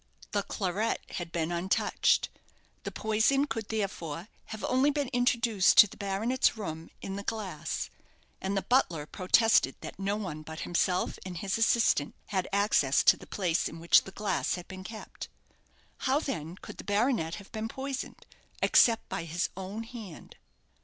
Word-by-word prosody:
The 205 - +1
claret 200 +3 -1
had 175 -2 -5
been 165 -1 -1
untouched. 175 +2 +2 0.6
The - - -3
poison 220 +6 +2
could, 225 -7 -4
therefore, 190 -4 -3 0.2
have 220 -1 -8
only 260 +3 +3
been 290 -3 -1
introduced 235 -5 +3
to - - +11
the - - -13
baronet's 220 +5 +1
room 160 -6 -5
in 195 0 -4
the 200 - -5
glass; 200 -8 -4 0.5
and 195 +1 -1
the 195 - 0
butler 175 - +2
protested 185 - +3
that - - -8
no 195 +1 0
one 180 -8 -5
but 160 +1 -8
himself 180 +1 0
and 185 -2 -6
his 195 +3 -2
assistant 225 -10 +3
had 190 -3 -1
access 200 -9 +3
to - - +7
the - - -14
place 180 -4 0
in 165 - -9
which 170 +1 +5
the 190 - -10
glass 200 -1 -1
had 180 -1 -8
been 185 0 -8
kept. 215 +3 -8 0.7
How, 270 +2 +2
then, 175 - -4
could - - -11
the - - -6
baronet 205 -5 +1
have 200 -2 -12
been 220 -1 -3
poisoned, 270 +3 -5 0.3
except 230 -2 +4
by 165 - -4
his 170 +2 -1
own 195 +4 -5
hand? 225 -7 -10
200 Hz, 165 wpm, -29 LUFS, 175-225 Hz, 0.7 s, to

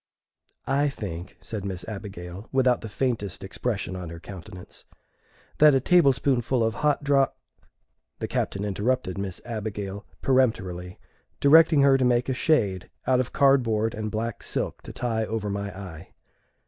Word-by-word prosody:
"I 140 +2 +2
think," 95 -9 -7
said 110 -4 -5
Miss 95 -1 -5
Abigail, 95 -2 -7
without 130 -2 +3
the 110 - -6
faintest 105 -5 -2
expression 100 -1 -3
on 90 -2 -6
her 85 0 -8
countenance, 90 -1 -11 0.8
"that 150 -2 +7
a - - +4
table 165 0 +5
spoonful 125 -2 +1
of 110 0 +1
hot 145 +7 +1
dro 140 -1 +4 0.5
" - - -51
The - - -3
Captain 100 +1 -2
interrupted 100 -1 -1
Miss 95 -2 -4
Abigail 105 -3 -5 0.2
peremptorily, 95 -9 +1 0.4
directing 160 +1 +6
her 135 -1 +5
to - - +2
make 125 0 +2
a - - +1
shade 105 - +1 0.2
out 130 -1 +3
of 130 - -1
cardboard 115 -6 +3
and 110 0 -3
black 110 +1 -3
silk - - -3
to - - -9
tie 115 -2 -1
over 105 -2 -3
my 100 0 -3
eye. 90 -3 -9
110 Hz, 155 wpm, -26 LUFS, 95-130 Hz, 0.8 s, that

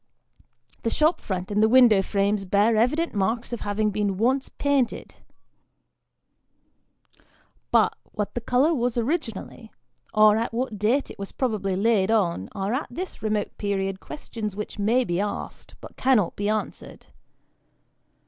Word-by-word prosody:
The 230 - 0
shop 310 +7 +2
front 185 0 -4
and 205 +1 +2
the 220 - +5
window 240 -5 +6
frames 200 +1 0
bear 205 +4 +3
evident 280 +10 +1
marks 225 +5 -1
of 240 - -4
having 210 +1 0
been 205 -2 -1
once 260 +5 +1
painted; 280 -4 -1 2.6
but, - - +3 0.2
what 210 -1 -3
the 240 - -3
colour 255 +7 +2
was 245 -4 -1
originally, 235 - -3 0.4
or 215 0 +5
at 230 0 -2
what 235 -4 -2
date 240 +7 +1
it - - -13
was 195 - -6
probably 210 -7 -1
laid 205 -1 +2
on, 175 - +1
are 195 +3 -2
at 265 - -2
this 370 +2 -7
remote 215 -1 -2
period 195 -2 -2
questions 220 -8 -6
which 210 0 -6
may 230 +5 +3
be 175 -5 -2
asked, 205 0 -5
but - - -12
cannot 250 -9 +2
be 205 +1 -1
answered. 215 0 -4
215 Hz, 145 wpm, -25 LUFS, 200-245 Hz, 2.6 s, window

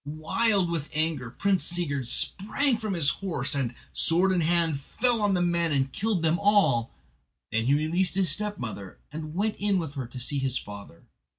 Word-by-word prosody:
Wild 170 +6 0
with 155 -3 -3
anger 155 -6 0
Prince 195 +8 0
Sigurd 145 -8 -2
sprang 235 - 0
from 215 -3 -3
his 150 -5 +2
horse 145 -9 +3
and, 130 -4 -2 0.2
sword 180 +4 +2
in 180 -2 +1
hand, 165 -2 +1
fell 240 - 0
on 205 -2 +2
the 175 - +1
men 170 -1 +1
and 135 -2 0
killed 210 -5 -1
them 165 +1 +2
all. 195 - +3 0.6
Then 110 +1 0
he 135 +3 +3
released 170 +5 +1
his 190 -5 +2
stepmother, 125 - -5
and 155 +1 -7
went 210 +3 -1
in 205 -1 +1
with 160 -5 -3
her 135 -4 -5
to 125 +2 -9
see 140 +3 0
his 135 -1 0
father. 100 -4 -10
165 Hz, 185 wpm, -27 LUFS, 140-195 Hz, 0.6 s, horse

